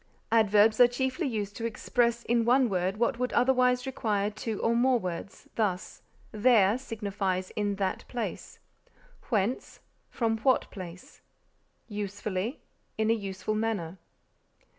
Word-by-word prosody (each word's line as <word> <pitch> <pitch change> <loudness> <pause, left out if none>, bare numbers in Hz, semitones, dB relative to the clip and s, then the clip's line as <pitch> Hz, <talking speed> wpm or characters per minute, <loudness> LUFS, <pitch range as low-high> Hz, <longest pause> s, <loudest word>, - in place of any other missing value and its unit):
Adverbs 215 0 +4
are 245 - +9
chiefly 260 +6 -1
used 205 -4 -3
to 230 - -4
express 235 +1 0
in 235 0 +2
one 250 +1 +4
word 185 +1 -1
what 235 +1 0
would 250 0 -1
otherwise 250 0 +3
require 210 -6 -1
two 215 0 -4
or 230 +1 +2
more 250 +1 +4
words; 180 -2 -6
thus, 195 -5 -2 0.3
There 215 -1 +4
signifies 200 -6 -3
in 205 -1 -1
that 195 -1 -2
place; 240 -2 -5 0.7
whence, 220 +1 -1 0.3
from 225 -2 -1
what 255 +3 +2
place; 180 -2 -10 0.7
usefully, 205 +2 -4 0.4
in 220 0 +2
a - - +5
useful 200 -1 -3
manner. 210 -6 -2
220 Hz, 130 wpm, -28 LUFS, 200-240 Hz, 0.7 s, are